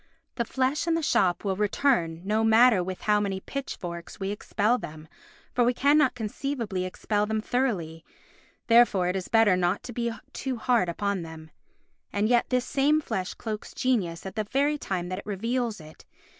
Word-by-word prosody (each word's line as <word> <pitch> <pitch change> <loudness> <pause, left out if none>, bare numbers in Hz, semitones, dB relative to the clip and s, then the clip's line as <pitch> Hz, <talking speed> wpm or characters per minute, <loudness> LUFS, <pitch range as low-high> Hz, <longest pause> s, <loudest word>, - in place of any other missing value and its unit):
The 235 - -2
flesh 265 +7 0
and 330 -1 +2
the 330 - -2
shop 185 -10 +2
will 195 -2 0
return 195 -5 +1
no 215 +2 +1
matter 225 -3 +5
with 185 0 -6
how 210 -1 +3
many 195 -2 -2
pitchforks 175 -9 -6
we 195 0 -2
expel 210 +3 0
them, 155 -4 -9 0.5
for 245 - +3
we 245 +1 +2
cannot 285 0 +3
conceivably 225 -4 -3
expel 205 +3 -1
them 220 0 0
thoroughly; 200 -10 -2 0.6
therefore 230 -6 +4
it 180 - -1
is 190 -2 -3
better 225 -4 +4
not 180 -1 0
to 245 - -7
be 235 0 -1 0.2
too 260 -2 -3
hard 230 -6 +2
upon 200 +2 -1
them. 160 -1 -10 0.6
And 205 +1 +1
yet 240 0 +2
this 250 -1 +1
same 290 +3 +2
flesh 190 -11 -4
cloaks 215 -2 -6
genius 195 -11 0
at 190 - -6
the 215 -1 -1
very 285 +6 +1
time 180 -6 -3
that 185 +1 -3
it - - -11
reveals 230 +2 -2
it. 155 0 -14
215 Hz, 180 wpm, -27 LUFS, 185-250 Hz, 0.6 s, matter